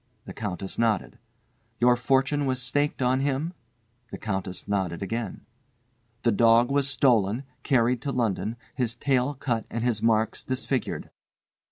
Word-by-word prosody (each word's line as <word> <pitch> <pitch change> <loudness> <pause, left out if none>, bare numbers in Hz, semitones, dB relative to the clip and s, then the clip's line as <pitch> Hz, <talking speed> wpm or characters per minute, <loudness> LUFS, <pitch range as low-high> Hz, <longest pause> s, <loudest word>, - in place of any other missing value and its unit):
The - - -8
Countess 95 -2 -4
nodded. 115 -4 0 0.6
"Your 125 0 +5
fortune 135 +3 +1
was 130 -1 0
staked 140 +2 0
on 130 +1 +2
him?" 140 +5 -1 0.6
The - - -6
Countess 95 -3 -4
nodded 95 -3 -1
again. 115 +3 -4 0.8
"The 120 - +4
dog 115 +3 +5
was 140 0 +2
stolen, 120 -4 +2 0.2
carried 125 -3 +2
to 140 - -2
London, 115 -2 -1 0.2
his 120 -3 -1
tail 130 +2 +1
cut 120 -4 -2
and 115 - -3
his 120 -3 0
marks 110 -1 +1
disfigured." 130 0 -2
120 Hz, 140 wpm, -26 LUFS, 110-135 Hz, 0.8 s, Your